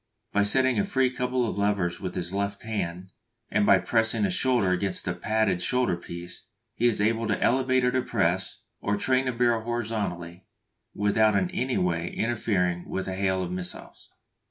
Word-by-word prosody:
By 105 - +3
setting 125 +1 +2
free 130 -1 +1
a 130 - -1
couple 125 -1 0
of 100 - -3
levers 100 -4 0
with 90 -2 -5
his 90 0 -3
left 100 0 -2
hand, 95 -4 -4 0.4
and 105 0 +2 0.2
pressing 110 - +2
his 195 -3 +1
shoulder 125 - +2
against 90 +1 +1
the 90 - -1
padded 100 0 0
shoulder 125 0 +1
piece, 85 0 -10 0.3
he 120 - +2
is 115 - +2
able 115 +2 +1
to 105 - 0
elevate 130 0 +2
or 125 - +3
depress, 95 -7 -1 0.2
or 100 0 -1
train 130 +4 +1
the 125 - 0
barrel 120 -1 +1
horizontally, 105 -7 -4 0.5
without 105 +1 +3
in 180 - +1
any 135 -9 -1
way 85 -1 0
interfering 95 -7 -1
with 95 - -3
the 95 - -3
hail 95 -1 0
of 90 - -5
missiles. 90 0 -5
105 Hz, 175 wpm, -26 LUFS, 90-120 Hz, 0.5 s, By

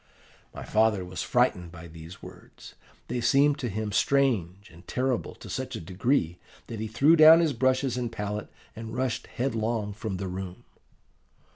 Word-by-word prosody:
"My - - -8
father 110 -3 +2
was 90 0 -5
frightened 90 -2 +1
by 85 -1 -11
these 80 +2 -12
words: - - -13 0.3
they 120 0 -2
seemed 140 +5 +3
to 125 - -2
him 105 +1 -3
strange 105 -7 +1
and 85 +2 -17
terrible 130 -1 -1
to - - -12
such - - -4
a - - -4
degree, 90 - -1 0.3
that 115 - -7
he 110 - -3
threw 135 +9 +4
down 160 +1 +9
his 165 -4 +2
brushes 130 +1 +1
and 120 -2 -2
palette 105 -1 -4 0.3
and 115 0 -7
rushed 130 -2 -2
headlong 115 -4 -2
from 105 -2 -5
the 95 +1 -4
room. 95 0 -6
110 Hz, 165 wpm, -27 LUFS, 95-130 Hz, 0.3 s, down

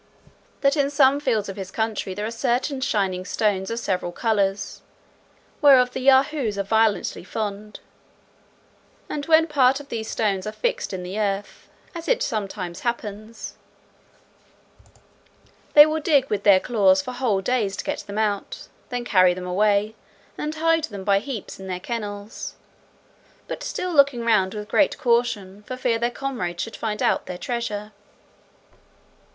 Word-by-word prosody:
"That 275 +1 +3
in 280 -2 +2
some 280 -1 +4
fields 230 -8 0
of 195 0 -7
his 190 -2 -6
country 215 -3 -2
there 210 +2 -3
are 225 - -3
certain 255 +3 -1
shining 195 -8 0
stones 195 -1 0
of 230 - -3
several 185 -6 -2
colours, 200 -1 -1 0.8
whereof 260 -4 +6
the - - -3
Yahoos 265 -4 +3
are 200 - 0
violently 220 -1 +1
fond: 210 +1 -5 1.3
and 290 0 -4
when 320 0 +6
part 275 -3 +3
of 285 -1 -12
these 220 -1 -4
stones 200 -3 -1
is 215 - -5
fixed - - -1
in 185 -2 -5
the 185 +4 -5
earth, 205 -1 -3 0.2
as 335 -2 -7
it - - +2
sometimes 195 - -4
happens, 220 -1 -5 2.2
they 295 0 +11
will 310 0 -1
dig 285 -3 +2
with 205 -1 0
their 200 -2 +6
claws 195 -4 +3
for 255 - -5
whole 245 -6 0
days 205 -3 0
to - - -4
get - - -3
them 200 +1 -7
out; 210 -2 -2 0.2
then 245 -1 -3
carry 185 -5 +4
them 180 0 -6
away, 205 +3 +2 0.4
and 300 +1 -4
hide 325 0 +2
them 200 -8 -8
by 195 0 +3
heaps 230 -4 -7
in 190 - -8
their 180 -1 -3
kennels; 205 -1 -6 0.9
but - - -5
still 365 -1 -3
looking 280 -5 +4
round 210 -4 +2
with 210 0 -6
great 295 +6 +2
caution, 235 -6 0
for 255 +4 -7
fear 245 -3 0
their 235 +1 +1
comrades 215 -10 -3
should 225 - -7
find 215 -2 -3
out - - +1
their 180 - -5
treasure." 215 -2 -4
220 Hz, 155 wpm, -23 LUFS, 200-260 Hz, 2.2 s, they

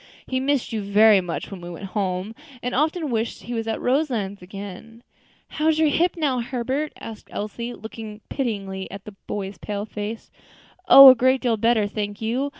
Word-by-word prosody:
He 260 - -1
missed 270 -2 0
you 220 - -1
very 205 0 +5
much 175 +2 -5
when 190 -2 -8
we 175 - -8
went 175 +3 -7
home, 190 +1 -2 0.3
and 250 - -2
often 310 +1 0
wished 230 0 -2
he 240 - -6
was 225 -1 -3
at 225 - -2
Roselands 245 - -1
again." 200 +5 -10 0.4
"How 305 0 -2
is 320 -1 +3
your 315 -1 +3
hip 345 +5 +1
now, 280 -6 0
Herbert?" 260 +5 -2
asked 225 -1 -9
Elsie, 235 +3 -5
looking 220 -1 -9
pityingly 195 -7 -3
at 200 0 -9
the 210 - -9
boy's 195 -1 -5
pale 205 -1 -4
face. 215 +1 -6 0.6
"Oh! 275 0 +12
a - - +4
great 260 +2 +3
deal 240 -3 +1
better, 225 0 +2
thank 205 0 -4
you. 245 +6 -1
225 Hz, 185 wpm, -23 LUFS, 205-260 Hz, 0.6 s, Oh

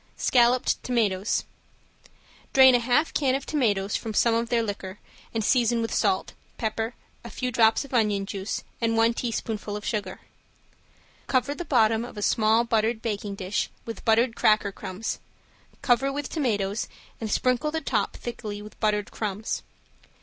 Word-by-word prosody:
~SCALLOPED 245 0 +3
TOMATOES~ 215 -5 0 1.1
Drain 260 -1 +8
a 245 - +5
half 250 +7 +1
can 265 -3 +2
of 275 - -3
tomatoes 210 -9 0
from 220 -2 -4
some 235 +2 +4
of 230 +1 0
their 235 -1 +2
liquor 200 -2 -5 0.3
and 225 -1 -1
season 240 -2 +3
with 225 0 -2
salt, 380 - +1 0.2
pepper, 225 0 -2 0.3
a - - -8
few 255 -1 -3
drops 225 +3 +4
of 270 - -14
onion 210 -4 +2
juice 195 0 -4 0.2
and 225 -1 +1
one 225 +1 +4
teaspoonful 220 -3 -3
sugar. 205 -3 -3 1.1
Cover 260 +2 +1
the 345 +4 -6
bottom 225 -5 +3
of 240 - -9
a 205 - -3
small 220 +2 +3
buttered 225 0 0
baking 205 -2 -3
dish 195 0 -2 0.2
with 230 - -7
buttered 230 +1 +3
cracker 215 -1 +3
crumbs, 190 +2 -5 0.6
cover 260 +2 +3
with 285 0 -4
tomatoes 210 - -1 0.3
and 220 - -4
sprinkle 255 +6 +1
the 320 +1 -2
top - - -1
thickly 215 -4 -6
with 210 +1 -12
buttered 210 -1 0
crumbs. 210 0 -3
225 Hz, 155 wpm, -26 LUFS, 210-245 Hz, 1.1 s, Drain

